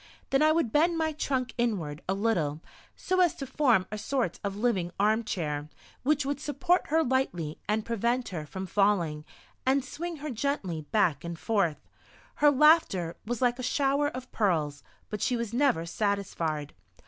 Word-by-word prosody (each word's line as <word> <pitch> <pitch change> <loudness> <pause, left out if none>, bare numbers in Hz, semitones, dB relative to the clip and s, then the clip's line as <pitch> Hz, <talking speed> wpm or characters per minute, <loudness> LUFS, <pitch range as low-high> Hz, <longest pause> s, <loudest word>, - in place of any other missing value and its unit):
Then 270 - +3
I 310 0 +5
would 315 -8 +1
bend 330 +5 +3
my 320 -1 +1
trunk 260 -4 -2
inward 175 -11 -1
a 190 - +2
little, 175 -9 0 0.4
so 370 0 -1
as 355 -3 +4
to 275 - -5
form 250 -8 +3
a 215 - -4
sort 245 -7 -1
of 200 -1 -2
living 205 -6 0
arm 215 +3 +3
chair, 150 -7 -3 0.3
which 290 +1 +1
would 280 0 -2
support 300 +5 +1
her 320 +2 +3
lightly 180 - -1
and 215 0 +1
prevent 235 +2 0
her 160 -5 -5
from 190 +4 -5
falling, 175 -6 +1 0.4
and 265 +1 +2
swing 340 +5 -5
her 300 -1 -5
gently 220 - -2
back 175 -10 +2
and 170 -1 -5
forth. 195 -6 0 0.5
Her 295 - +6
laughter 285 - +4
was 240 +1 -2
like 245 0 +2
a - - -2
shower 280 +3 +1
of 255 -3 -7
pearls, 155 -9 0 0.3
but 210 - -4
she 250 - +1
was 230 -1 -4
never 245 - +2
satisfied. 170 -6 -2
230 Hz, 170 wpm, -28 LUFS, 175-280 Hz, 0.5 s, Her